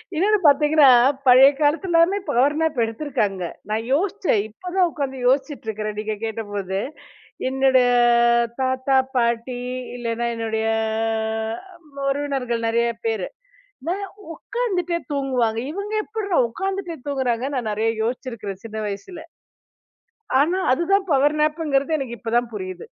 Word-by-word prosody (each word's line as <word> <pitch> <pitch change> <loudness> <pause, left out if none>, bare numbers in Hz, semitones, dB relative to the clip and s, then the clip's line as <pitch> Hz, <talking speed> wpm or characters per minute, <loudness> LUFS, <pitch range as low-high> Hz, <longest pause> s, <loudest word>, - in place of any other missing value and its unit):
இன்னொன்னு 415 +6 +3
பாத்தீங்கன்னா, 295 0 +5 0.4
பழைய 255 +2 +9
காலத்துல 330 +6 +1
எல்லாமே 370 +5 +4
பவர் 275 +5 +3
நேப் 320 -3 0
எடுத்திருக்காங்க. 220 -6 -2 0.3
நான் 220 +1 -1
யோசிச்சன். 365 - +1
இப்பதான் 360 - -1
உக்காந்து 275 -3 -4
யோசிச்சிட்டு 270 0 0
இருக்கிறன், 215 0 -4
நீங்கக் 215 0 -5
கேட்டபோது! 205 -4 -4 0.7
என்னோட 265 0 +3 0.8
தாத்தா, 260 +1 +1 0.2
பாட்டி 235 +1 0 0.4
இல்லைனா 235 0 -2
என்னுடைய 220 -1 -2 1.4
உறவினர்கள் 270 -5 -2
நெறைய 235 +1 +1 0.2
பேரு, 220 -5 -1 0.5
என்ன 330 +6 -1 0.6
உக்காந்துட்டே 365 -9 -1
தூங்குவாங்க. 255 -5 0
இவங்க 400 +3 -5
எப்படிட்ரா 420 -5 -2
உக்காந்துட்டே 385 +5 -4
தூங்குறாங்கன்னு 265 -1 -1
நான் 235 -4 -2
நெறைய 220 +2 0 0.2
யோசிச்சிருக்கிறன் 230 -5 -5
சின்ன 220 -1 -7
வயசுல. 315 - -7 1.2
ஆனா, 330 +6 +2
அதுதான் 380 +8 +2
பவர் 290 +2 +3
நேப்ங்கிறது 305 -1 +1
எனக்கு 245 -3 -5
இப்போதான் 235 +2 0
புரியுது. 185 -3 -6
265 Hz, 110 wpm, -22 LUFS, 225-315 Hz, 1.4 s, பழைய